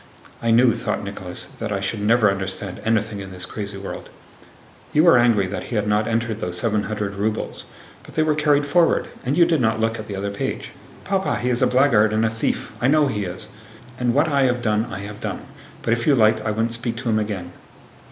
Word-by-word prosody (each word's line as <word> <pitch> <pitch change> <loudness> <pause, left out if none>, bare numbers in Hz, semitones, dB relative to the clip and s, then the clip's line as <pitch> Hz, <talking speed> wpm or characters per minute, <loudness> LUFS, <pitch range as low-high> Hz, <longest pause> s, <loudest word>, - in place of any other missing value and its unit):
"I 115 - 0
knew," 115 +1 +5
thought - - -3
Nicholas, - - -7
"that 110 -1 -3
I 100 - 0
should 100 +2 -3
never 105 0 +4
understand 95 -1 -4
anything 110 -2 0
in 95 -1 -8
this 90 0 -6
crazy 100 -2 -6
world." 100 - -7 0.8
"You 155 - +5
were 170 -4 +7
angry 115 -5 +4
that 95 0 -5
he 120 - -5
had 105 -1 +1
not 105 +1 +1
entered 115 -1 -1
those 90 -3 -4
700 105 -2 -1
rubles. 105 +2 -3 0.4
But - - -15
they 155 - +3
were 155 -1 +2
carried 145 -1 +2
forward—and 145 -3 +1
you 170 - +7
did 165 -4 +1
not 110 -1 +1
look 115 0 0
at 110 - -7
the 100 - -5
other 100 +1 -3
page." 100 - -4 0.3
"Papa, 195 -1 0
he 125 +2 -1
is 120 - 0
a - - +5
blackguard 120 -5 +4
and 110 +1 +2
a 110 - +1
thief! 115 - -2
I 125 - +3
know 150 +2 +4
he 105 -7 -2
is! 90 +1 -6 0.5
And 120 -1 +1
what 145 +3 +4
I 140 -3 +2
have 125 -1 0
done, 110 -1 +1
I 100 - -6
have 105 +1 -8
done; - - -4 0.4
but, 115 - +2
if 115 0 -2
you 145 - +6
like, 110 -2 +3
I - - -1
won't 115 +2 0
speak 115 0 -3
to 120 0 -3
him 110 -1 +2
again." 95 -5 -4
110 Hz, 225 wpm, -22 LUFS, 105-125 Hz, 0.8 s, were